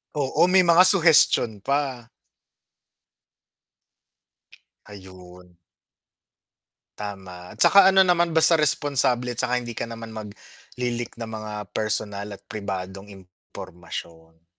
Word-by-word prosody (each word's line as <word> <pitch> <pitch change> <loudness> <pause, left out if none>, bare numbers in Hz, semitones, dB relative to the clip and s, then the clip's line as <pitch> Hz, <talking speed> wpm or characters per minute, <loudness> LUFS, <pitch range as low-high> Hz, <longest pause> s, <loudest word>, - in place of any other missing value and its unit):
Oo, 145 +4 +1
may 185 0 +4
mga 175 +1 +5
suhestion 160 - +4
pa. 135 0 -3 2.8
Ayun. 90 -3 -15 1.4
Tama, 95 -3 -9
at - - -16
saka 195 -1 +6
ano 190 -1 +4
naman, 175 -1 +2
basta 160 +1 +4
responsable 130 -5 0
'tsaka 125 +2 -1
hindi 120 -1 -8
ka - - -4
naman 115 -1 -9
magli-leak 120 +3 -8
ng 115 - -6
mga 110 -1 -8 0.2
personal 105 -1 -3
at 100 - -10
pribadong 95 -1 -7
impormasyon. 85 -3 -12
110 Hz, 100 wpm, -23 LUFS, 95-140 Hz, 2.8 s, saka